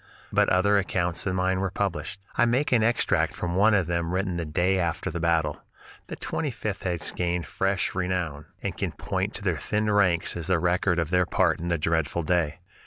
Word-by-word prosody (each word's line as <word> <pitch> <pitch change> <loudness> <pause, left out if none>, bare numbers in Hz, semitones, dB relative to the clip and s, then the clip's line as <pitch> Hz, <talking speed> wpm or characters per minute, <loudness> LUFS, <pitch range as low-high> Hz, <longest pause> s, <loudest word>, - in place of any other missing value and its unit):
But - - +4
other 100 +2 +4
accounts 90 -3 -1
than 95 -1 -1
mine 95 0 +1
were 95 0 0
published. 100 0 -3 0.2
I 120 - +4
make 130 +5 +1
an 120 -3 +4
extract 115 +1 +1
from 85 0 -3
one 105 +3 +5
of 95 -3 +2
them 85 +1 -1
written 95 -1 -1
the 85 -1 -2
day 90 +5 +1
after 85 -2 -1
the 85 - -4
battle: 80 -3 +1 0.5
"The - - -6
Twenty 155 - -3
fifth 105 -5 -4
has 85 -4 -1
gained 90 -2 -1
fresh 95 +7 -1
renown, 90 -5 -2 0.2
and - - -2
can - - -3
point - - -3
to - - -5
their - - 0
thinned 105 0 0
ranks 90 -5 +2
as 85 -1 -4
the 95 -2 +3
record 90 +1 +1
of 80 -1 -1
their 90 -1 +3
part 90 -4 +2
in 85 - -4
that 85 -3 0
dreadful 80 +1 0
fray. 80 -2 +1
90 Hz, 210 wpm, -26 LUFS, 85-95 Hz, 0.5 s, one